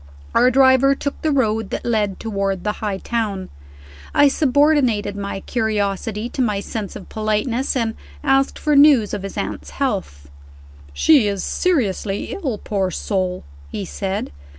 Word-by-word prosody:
Our 250 - +5
driver 265 +1 +5
took 285 +1 -4
the 315 - +1
road 225 -6 +1
that - - -4
led 210 -4 0
toward 195 -4 -2
the 210 - 0
High 205 -3 -1
Town. 205 -3 -3 0.7
I 285 - +6
subordinated 270 -8 +2
my 200 -1 -4
curiosity 215 -1 -1
to 265 - -3
my 210 -5 +1
sense 205 0 -5
of 190 - -9
politeness, 220 +5 -1
and 230 -3 0 0.3
asked 270 -1 +2
for 300 -2 +1
news 280 -7 +6
of - - -2
his 195 0 -7
aunt's - - -4
health. 190 - -3 0.6
"She 270 - +4
is 200 -2 -2
seriously 215 - -1
ill, 270 - -3
poor 195 -2 -1
soul," 185 0 -2 0.3
he 200 - -4
said. 195 - -3
220 Hz, 150 wpm, -20 LUFS, 200-265 Hz, 0.7 s, I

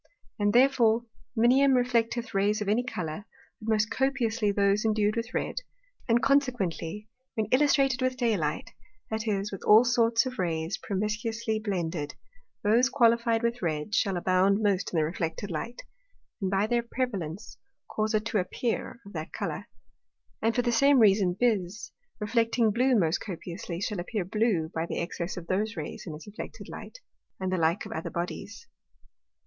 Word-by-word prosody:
And 205 0 +3
therefore 240 -2 +4 0.3
Minium 260 +4 +5
reflecteth 240 -1 0
Rays 205 +2 +2
of 210 - -3
any 215 +4 +3
Colour, 185 -6 -5 0.4
but 220 - -5
most 215 -1 +2
copiously 235 -5 +1
those 200 +1 +2
endu'd 215 -1 +2
with 230 +1 -3
red, - - -2 0.5
and 235 +2 +3
consequently 215 - 0 0.3
when 220 - 0
illustrated 270 -1 +3
with 255 0 0
day 235 -4 +2
light, 155 -4 -2 0.4
that 220 +1 -2
is, 200 -1 -1
with 195 - -6
all 220 +3 +7
sorts 235 0 +3
of 255 -3 -5
Rays 165 -2 -1
promiscuously 215 +2 -2
blended, 170 -8 -3 0.5
those 235 +5 +4
qualified 235 -3 +3
with 235 +1 -1
red, 155 +2 -2
shall 195 -3 +2
abound 190 +4 +2
most 195 -2 +1
in 170 - -1
the 155 - +3
reflected 165 +4 -3
Light, 230 +10 -5 0.6
and 190 - 0
by 195 +2 +2
their 235 +2 +1
prevalence 210 -8 -4 0.3
cause 215 +1 -1
it 215 0 0
to 220 -2 +1
appear 230 +6 -3
of 200 - -12
that 160 0 -5
Colour. - - -4 0.7
And 225 +1 +1
for 245 - +2
the 240 - +1
same 275 +4 +5
reason 195 -5 +4
Bise, 215 -4 0 0.3
reflecting 230 +1 +2
blue 250 +4 +3
most 165 -4 +2
copiously, 175 -2 -6
shall 205 -2 -2
appear 185 +2 -3
blue 195 -5 0
by 165 +1 -2
the - - -4
excess 170 +2 -4
of 175 - -6
those 210 +5 -1
Rays 155 - -6
in 155 - -5
its 155 - -11
reflected 210 +2 -9
Light; - - -9 0.4
and 190 -1 -2
the - - +1
like 165 +4 +1
of - - -8
other 160 - -4
Bodies. 180 - -5
215 Hz, 165 wpm, -28 LUFS, 185-235 Hz, 0.7 s, all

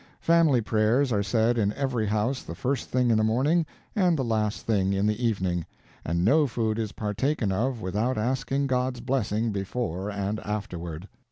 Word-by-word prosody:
Family 165 -7 +4
prayers 115 +5 +2
are 105 -3 +2
said 110 +3 +1
in 105 -1 +1
every 130 -6 -1
house 110 +6 0
the - - -8
first 135 0 -2
thing 125 -1 +2
in 110 - +3
the - - +2
morning 140 +9 +2 0.3
and 180 -5 +3
the 135 - 0
last 110 -2 -1
thing 100 -3 +1
in 100 +1 +1
the 105 +3 0
evening, 95 -6 0 0.4
and 85 +2 0
no 150 +6 +4
food 115 -2 -1
is 110 -2 -3
partaken 105 +2 -1
of 120 +4 -1
without 110 +7 -1
asking 130 +4 0
God's 125 -1 0
blessing 115 -3 0
before 100 -1 -3
and 100 +1 -2
afterward. 90 -5 -5
110 Hz, 175 wpm, -26 LUFS, 105-130 Hz, 0.4 s, Family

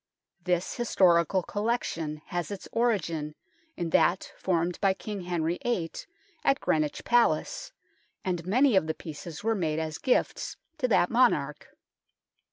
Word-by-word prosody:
This 180 0 0
historical 185 -6 +3
collection 165 -8 -2
has 175 -1 -2
its 200 -2 -7
origin 170 -10 0 0.4
in 170 -2 -2
that 185 - +2
formed 175 -1 -1
by 195 -1 +3
King 205 0 -6
Henry 175 -1 -1
VIII 185 -9 -1 0.5
at 275 - +3
Greenwich 155 -2 0
Palace, 240 0 +2 0.5
and 175 -3 -1
many 240 - +3
of 185 -4 +3
the 160 - -1
pieces 160 +2 -8
were 225 +1 +2
made 160 -7 -1
as 160 -1 -3
gifts 255 - 0 0.2
to 255 - +2
that 200 -6 +3
monarch. 230 - +2
180 Hz, 135 wpm, -28 LUFS, 160-215 Hz, 0.5 s, historical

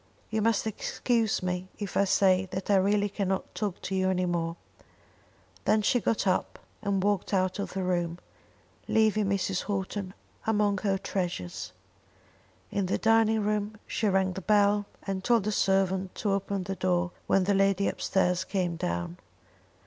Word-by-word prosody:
You 220 0 0
must 225 -1 +2
excuse 220 0 0
me 180 0 -2
if 205 -3 -5
I 200 - +4
say 190 -1 +3
that 190 +2 -3
I - - +6
really 205 +2 +2
cannot 195 -2 -2
talk 205 -4 -3
to 195 - -3
you 190 0 +2
any 185 -1 +1
more." 165 -1 -1 1.1
Then 215 -1 +3
she 245 - +3
got 225 -2 0
up 185 -1 0 0.2
and 200 -3 0
walked 205 0 +1
out 185 +1 0
of 200 - -4
the 190 - -2
room, 175 -2 -1 0.7
leaving 215 -2 +3
Mrs. 195 -1 -1
Houghton 195 -1 -3 0.3
among 205 -2 +2
her 195 -1 +1
treasures. 175 - -4 1.0
In 200 -3 0
the - - +1
dining 225 -1 +3
room 210 0 -1
she 220 - -1
rang 190 -1 +2
the 190 - -5
bell 205 +1 +3 0.2
and 195 -1 -3
told 235 -2 +3
the 215 - -1
servant 190 -1 +1
to 205 - -1
open 195 0 -1
the 195 +1 -4
door 180 -1 0 0.2
when 195 - +3
the 200 +2 +2
lady 195 0 +3
upstairs 185 -1 +1
came 180 -4 -1
down. 85 - -3
195 Hz, 165 wpm, -28 LUFS, 185-205 Hz, 1.1 s, I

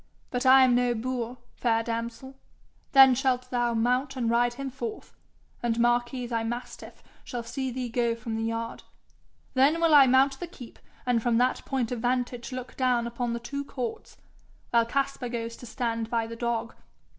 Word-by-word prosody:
But 250 +1 0
I 265 0 +8
am 255 -1 +4
no 245 0 +2
boor, 245 +1 -3 0.2
fair 230 -2 +1
damsel. 230 +3 -5 0.6
Then 270 -1 +8
shalt 255 -1 0
thou 240 -1 +1
mount 250 +4 +1
and 235 -3 0
ride 240 +1 +2
him 275 0 -5
forth, 420 - -7 0.5
and 235 -1 0
Marquis 240 +1 +1
thy 230 -1 -2
mastiff 240 +2 -6 0.2
shall 240 -1 -5
see 260 +3 -3
thee 250 0 -3
go 235 0 0
from 230 -1 -5
the 225 - -2
yard. 230 0 -3 0.7
Then 275 +5 +4
will 330 -2 +3
I 280 -2 +8
mount 270 +2 +4
the 350 - -5
keep, 255 -8 -12 0.3
and 245 -2 +2
from 235 0 +2
that 250 +2 +1
point 255 -4 -1
of 245 - -2
vantage 245 +1 -1
look 255 0 -7
down 250 -2 +1
upon 235 0 -3
the 235 - -3
two 280 +4 -5
courts, 250 -4 -6 0.5
while 235 -1 +3
Caspar 275 -1 -1
goes 230 -1 -4
to 245 - -11
stand 230 -2 -2
by 230 -1 0
thy 230 - -8
dog. 230 -1 -2
245 Hz, 180 wpm, -27 LUFS, 235-260 Hz, 0.7 s, I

